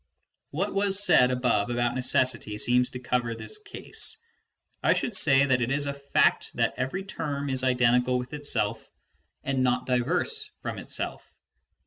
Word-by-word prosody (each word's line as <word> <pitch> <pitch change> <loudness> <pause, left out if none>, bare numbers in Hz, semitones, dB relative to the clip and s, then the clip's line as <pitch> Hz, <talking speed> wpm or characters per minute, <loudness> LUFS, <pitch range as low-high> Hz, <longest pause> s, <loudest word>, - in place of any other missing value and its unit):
"What 190 +8 -2
was 195 0 +1
said 125 -11 +5
above 125 -4 0
about 120 0 0
necessity 125 -4 0
seems 125 +3 +2
to 125 - -8
cover 125 -2 -1
this 425 - -7
case: 415 -1 -1 0.6
I - - +4
should 240 - -2
say 140 -7 +4
that 130 -2 +1
it 115 - 0
is 145 +2 0
a 140 - -2
fact 140 0 +1
that - - +1
every 135 +10 -3
term 145 -7 -4
is 130 0 +1
identical 125 0 +2
with 125 +2 -6
itself 115 -7 -2 0.5
and 135 -1 -1
not 125 0 +1
diverse 280 - +1
from - - -4
itself. - - -5
130 Hz, 155 wpm, -26 LUFS, 125-145 Hz, 0.6 s, said